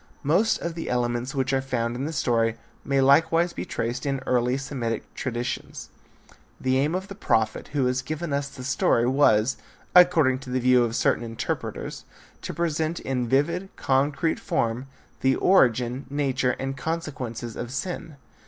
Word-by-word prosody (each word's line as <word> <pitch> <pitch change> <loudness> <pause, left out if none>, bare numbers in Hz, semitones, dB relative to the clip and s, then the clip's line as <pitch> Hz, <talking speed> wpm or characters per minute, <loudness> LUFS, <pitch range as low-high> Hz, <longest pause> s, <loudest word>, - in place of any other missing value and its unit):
Most 180 +10 +3
of 170 - -3
the 165 0 -5
elements 120 +2 -1
which 135 0 0
are 135 - +2
found 120 -3 -2
in 130 +3 -3
the 155 - -3
story 115 -6 +1 0.3
may 140 -1 +1
likewise 165 +5 +4
be - - -5
traced 120 +2 -3
in 140 -1 -1
earlier 125 +1 +1
Semitic 125 -5 -4
traditions. 120 -2 -4 0.7
The 130 0 +1
aim 150 +5 +1
of 190 +1 -3
the 200 - -7
prophet 110 - 0
who 145 -3 0
has 125 +1 +1
given 155 +3 -4
us 140 0 0
the 130 - -10
story 120 -2 +2
was, 130 -3 +3 0.4
according 160 -8 +6
to 135 -1 -10
the 130 +1 0
view 125 0 +4
of 115 -1 -2
certain - - +2
interpreters, 115 -1 -4 0.4
to - - -5
present 160 0 -1
in 125 -2 -2
vivid, 170 +8 +1
concrete 140 +4 +1
form 120 +3 -1 0.3
the 130 0 +3
origin, 125 - +3
nature, 135 -3 0
and 135 0 -3
consequences 130 -6 -4
of 120 - -5
sin. 165 +2 -4
135 Hz, 160 wpm, -25 LUFS, 125-150 Hz, 0.7 s, according